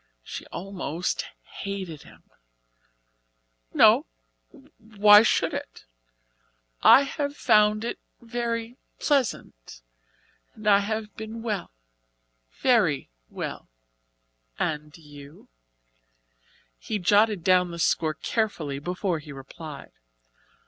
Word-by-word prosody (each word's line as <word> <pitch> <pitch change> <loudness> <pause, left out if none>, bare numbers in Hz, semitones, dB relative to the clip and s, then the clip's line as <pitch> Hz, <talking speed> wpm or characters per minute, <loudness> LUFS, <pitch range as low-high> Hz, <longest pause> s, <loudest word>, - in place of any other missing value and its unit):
She - - -8
almost 180 -2 -4 0.4
hated 190 -6 -5
him. - - -17 1.5
"No - - +5 0.7
why 210 -2 +6
should 225 - +1
it? - - -7 1.0
I 275 - +8
have 285 +1 -4
found 215 -1 +3
it 235 - -4 0.2
very 235 0 -4 0.2
pleasant 205 - -2 0.7
and 215 -1 -8
I 200 -1 +6
have 215 +1 -4
been 220 +1 -7
well 210 -5 -3 0.9
very - - +2 0.2
well. - - -6 0.9
And 150 -1 -3
you?" 145 -1 -14 1.3
He 215 - -3
jotted 205 0 +3
down 180 -1 +3
the 170 - -7
score 160 -1 +1
carefully 155 -10 -2
before 180 +2 -2
he 145 -1 -11
replied. 140 +2 -10
200 Hz, 95 wpm, -26 LUFS, 160-220 Hz, 1.5 s, I